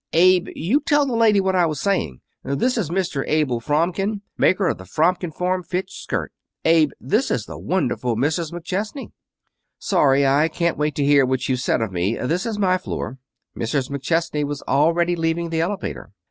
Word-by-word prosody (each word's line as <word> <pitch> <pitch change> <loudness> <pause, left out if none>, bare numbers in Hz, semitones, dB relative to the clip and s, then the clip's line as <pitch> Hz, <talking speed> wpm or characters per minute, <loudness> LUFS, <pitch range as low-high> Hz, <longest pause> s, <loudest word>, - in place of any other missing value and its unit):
"Abe, 180 +2 +5
you 205 - +1
tell 295 -2 +2
the 265 - -2
lady 220 -3 +4
what 190 -1 +1
I 175 -2 +4
was 155 -3 -3
saying. 135 - -1 0.2
This 140 - 0
is 210 -10 -1
Mr. 170 -6 -1
Abel 150 -6 +1
Fromkin, 180 - 0
maker 185 0 +2
of - - -1
the - - -9
Fromkin 165 - 0
Form 180 +3 -1
Fit 180 +2 -4
Skirt. - - -4 0.3
Abe, 160 -2 +5
this 215 - 0
is 115 -4 -1
the - - -9
wonderful 135 -9 -1
Mrs. 150 +6 -1
McChesney." 195 - -4 0.7
"Sorry 140 -7 +3
I 140 +4 +3
can't 170 +1 -1
wait 150 -1 -1
to 145 - 0
hear 140 -1 +5
what 130 0 -1
you've 130 -1 0
said 125 - 0
of 110 -3 -2
me. 90 +5 0
This 170 - -1
is 220 -2 -3
my 185 -2 +2
floor." 135 -8 -5 0.4
Mrs. 130 +4 -2
McChesney 150 +2 -1
was 145 -1 -4
already 170 +5 +2
leaving 165 0 -1
the 160 0 0
elevator. 190 +3 -4
165 Hz, 185 wpm, -22 LUFS, 140-185 Hz, 0.7 s, Abe